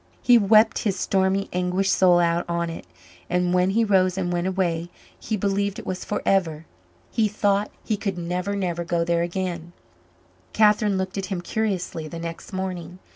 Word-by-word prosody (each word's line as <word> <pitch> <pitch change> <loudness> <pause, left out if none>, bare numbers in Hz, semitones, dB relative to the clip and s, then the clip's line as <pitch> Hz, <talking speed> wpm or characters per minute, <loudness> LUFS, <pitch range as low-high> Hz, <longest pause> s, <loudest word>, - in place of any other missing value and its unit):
He 245 - +6
wept 215 +2 +4
his 200 -4 -1
stormy, 190 +1 +1
anguished 180 +2 0
soul 180 -2 +5
out 170 0 +2
on 170 0 -1
it; 165 - -9 0.4
and 180 0 +1
when 180 +1 +3
he 225 +4 +2
rose 190 -3 +2
and 175 -2 -1
went 175 +1 -1
away, 175 -3 -1 0.3
he 220 - -3
believed 200 0 -1
it - - -8
was 185 -1 -4
forever. 175 -6 0 0.5
He 220 -2 +2
thought 205 0 0 0.2
he 215 - 0
could 200 -3 -3
never, 180 +3 -2
never 175 -3 -2
go 170 0 0
there 170 0 +1
again. 175 -1 -3 0.8
Catherine 210 -2 +3
looked 190 +1 -3
at 190 - -4
him 190 -2 -3
curiously 185 -6 -2
the 165 - -7
next 165 0 -7
morning. 185 -2 -5
185 Hz, 175 wpm, -24 LUFS, 175-200 Hz, 0.8 s, He